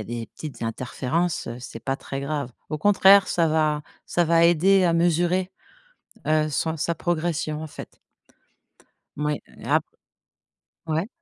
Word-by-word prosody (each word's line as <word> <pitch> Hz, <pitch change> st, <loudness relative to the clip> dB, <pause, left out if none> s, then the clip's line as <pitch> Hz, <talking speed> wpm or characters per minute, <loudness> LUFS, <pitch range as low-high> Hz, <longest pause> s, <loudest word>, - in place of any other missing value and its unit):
a 105 Hz, -, -5 dB
des 115 Hz, -, -5 dB
petites 150 Hz, -6 st, -8 dB
interférences, 130 Hz, +8 st, -2 dB
heu, 120 Hz, +1 st, -6 dB
c'est -, -, -8 dB
pas 135 Hz, -, 0 dB
très 135 Hz, -1 st, -6 dB
grave. 140 Hz, -2 st, -3 dB, 0.2 s
Au 155 Hz, -, -2 dB
contraire, 195 Hz, +2 st, +6 dB
ça 170 Hz, -1 st, +2 dB
va 155 Hz, -1 st, +1 dB, 0.2 s
ça 175 Hz, -, +1 dB
va 165 Hz, +1 st, +4 dB
aider 185 Hz, +3 st, +5 dB
à 170 Hz, -2 st, +3 dB
mesurer, 175 Hz, +2 st, +1 dB, 0.8 s
heu, 155 Hz, 0 st, +3 dB
son 160 Hz, +3 st, -1 dB
sa 170 Hz, +3 st, 0 dB
progression, 160 Hz, -2 st, -2 dB
en -, -, -6 dB
fait -, -, -11 dB, 1.2 s
moui, 150 Hz, 0 st, -1 dB, 0.2 s
et -, -, -10 dB
ap -, -, +3 dB, 1.0 s
Ouais. 160 Hz, +5 st, -1 dB
160 Hz, 150 wpm, -24 LUFS, 150-175 Hz, 1.2 s, contraire